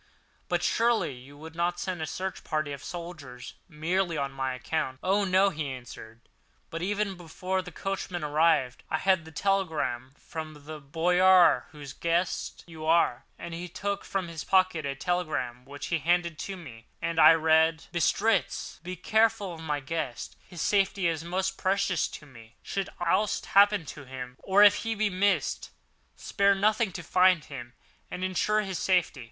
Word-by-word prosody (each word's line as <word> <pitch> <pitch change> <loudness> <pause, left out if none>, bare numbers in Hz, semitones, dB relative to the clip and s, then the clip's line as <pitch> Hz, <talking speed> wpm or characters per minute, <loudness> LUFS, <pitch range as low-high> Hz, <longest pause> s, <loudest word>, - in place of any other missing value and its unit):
"But - - 0
surely 230 - +2
you 130 +3 -13
would 160 +2 -10
not 175 +1 -1
send 185 -3 -3
a 160 - -2
search 190 +4 -5
party 155 -2 -2
of 140 - -8
soldiers 155 -8 -8 0.2
merely 170 +2 -1
on 140 -1 -3
this 130 -1 -2
account?" 130 +1 -2
"Oh, 200 +2 +2
no!" 190 +1 +4
he 150 -4 -4
answered; 120 -2 -10 0.5
"but 165 - -4
even 205 +2 -1
before 180 +2 -3
the 180 -1 -10
coachman 185 -2 -4
arrived, 150 -4 +2
I 155 - +1
had 185 -2 +2
this 160 -1 -13
telegram 160 -10 -1
from 155 -3 -8
the 155 0 -7
Boyar 175 0 +4
whose 145 -3 -9
guest 170 +2 -1
you 160 -2 -10
are," 160 -7 +3
and 170 -1 -7
he 175 +2 -6
took 200 +4 -3
from 190 -3 -3
his 165 -3 -6
pocket 185 -6 +2
a 135 - -3
telegram 140 -8 -2
which 140 +1 -7
he 165 - +2
handed 170 +1 +1
to 195 -1 -5
me, 120 -10 -12
and 165 -1 -2
I 165 - +9
read: 160 0 +3
Bistritz. 205 +6 0
Be 180 +2 -6
careful 220 0 +1
of 165 - -10
my 150 -2 -2
guest—his 160 +3 -5
safety 195 -2 +2
is 165 -1 -1
most 190 +2 -2
precious 195 -1 +1
to 150 - -10
me. 115 -5 -16
Should 195 -1 -3
aught 175 +5 +1
happen 200 -2 +5
to 145 - -11
him, 125 -1 -8
or 200 +2 +4
if 205 - +7
he 225 0 -2
be 210 -1 0
missed, 195 +2 0 0.5
spare 200 -1 +2
nothing 215 +1 +2
to 175 - -6
find 180 0 +4
him 120 -4 -9 0.4
and 180 - -5
ensure 210 +3 +1
his 190 -3 -4
safety. 180 -6 +1
170 Hz, 170 wpm, -28 LUFS, 150-190 Hz, 0.5 s, I